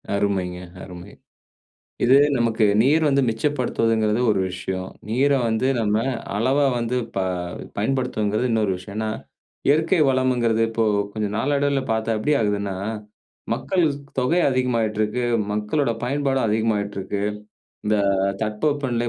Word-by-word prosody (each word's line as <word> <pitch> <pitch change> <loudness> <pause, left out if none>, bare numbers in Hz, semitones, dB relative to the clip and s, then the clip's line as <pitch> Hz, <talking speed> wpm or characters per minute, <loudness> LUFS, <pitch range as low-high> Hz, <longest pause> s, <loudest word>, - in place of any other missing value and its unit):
அருமைங்க 95 -3 -1 0.2
அருமை. 90 +1 -10 0.9
இது, 130 +3 +6 0.2
நமக்கு 115 -2 +1 0.2
நீர் 155 +5 +3
வந்து 140 -1 +3
மிச்சப்படுத்துவதுங்கிறது 115 -3 0
ஒரு 100 - +1
விஷயம். 95 0 -4 0.2
நீரை 135 +5 +2
வந்து 110 +3 0
நம்ம 105 -1 +1 0.4
அளவா 135 +6 +2
வந்து 120 +1 -1 0.2
ப - - +1 0.6
பயன்படுத்துவதுங்கிறது 110 -1 0
இன்னொரு 105 -4 +1
விஷயம். 100 +3 -10
ஏன்னா, 110 0 -1 0.6
இயற்கை 160 +5 +3
வளம்ங்கிறது, 125 -4 +2
இப்போ, 115 0 0 0.3
கொஞ்சம் 105 -1 -3
நாளடைவில 140 0 +1
பார்த்தா 110 0 0
எப்படி 150 +8 0
ஆகுதுன்னா, 100 -2 -1 0.8
மக்கள் 180 -3 0
ஸ் 140 - -8 0.2
தொகை 145 +8 +2
அதிகமாயிட்டுருக்கு, 115 -3 0 0.3
மக்களோட 105 +6 0
பயன்பாடும் 135 -1 0
அதிகமாகிட்டுருக்கு. 105 -2 -1 0.6
இந்த 110 - +3 0.5
தட்பவெப்பநிலை 120 +2 -1
115 Hz, 115 wpm, -22 LUFS, 105-130 Hz, 0.9 s, இது